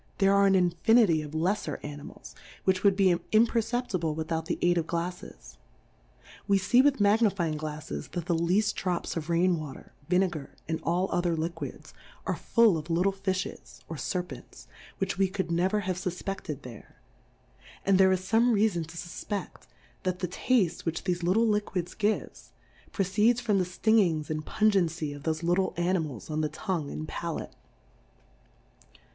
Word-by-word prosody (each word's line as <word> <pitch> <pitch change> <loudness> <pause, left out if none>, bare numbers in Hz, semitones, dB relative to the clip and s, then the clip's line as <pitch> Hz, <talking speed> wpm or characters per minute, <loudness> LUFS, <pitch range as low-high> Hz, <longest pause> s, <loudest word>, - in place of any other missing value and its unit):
there 195 0 +4
are 200 0 +5
an 195 - +4
infinity 180 0 +4
of 150 0 -8
lefler 185 +6 0
Animals, 145 0 -9 0.3
which 190 0 +1
would 200 -2 +5
be 190 -2 +4
im 215 +6 +3
perceptible, 225 -9 -1
without 160 0 -3
the - - -1
aid 175 0 +4
of 165 - -3
GlalTes. 170 - -5 0.9
We 200 - +4
fee 240 +6 +4
with 275 -1 +3
Magnifying 200 -6 +2
GlalTes 150 - -5
that 175 -2 -3
the 175 - +1
leaft 185 +6 +2
Drops 180 -2 -2
of 165 -1 -4
Rain 170 0 +2
Water, 150 -4 -9 0.2
Vine 185 +2 +4
gar, 155 -6 -8
and 160 0 -2
all 180 +3 0
other 175 -2 +1
Liquids, 165 +1 -5 0.3
are - - 0
full 225 -8 +3
of 155 +2 -10
little 175 +4 +2
Fillies, 190 -1 -4
or 165 - -6
Serpents, 180 +5 -5 0.3
which 195 -1 -2
we 195 - +4
could 190 -2 -3
never 185 +5 +1
have 185 -2 -2
fufpefted 180 -5 -4
there; 120 -4 -12 0.9
and 195 -1 +4
there 190 0 +6
is 185 -1 +1
fome 230 +5 +3
Reafon 200 -6 +1
to 165 +1 -11
fufpeft, 180 +3 -6 0.3
that 185 -1 -1
the 180 - -2
Taftes 185 -1 +1
which 165 -1 -3
thefe 180 -2 -1
little 190 +7 +3
Liquids 205 -4 -1
gives, 215 0 -2 0.4
proceeds 210 +5 +2
from 215 -5 +1
the 180 - +1
Stingings 180 -5 +2
and 155 0 -2
Pungency 170 -8 +1
of 145 - -9
thofe 160 +2 -2
little 175 +3 +1
Animals 165 - -1
on 155 0 0
the 155 - 0
Tongue 165 -2 -3
and 155 - -5
Palate. 170 0 -5
180 Hz, 165 wpm, -28 LUFS, 165-200 Hz, 0.9 s, there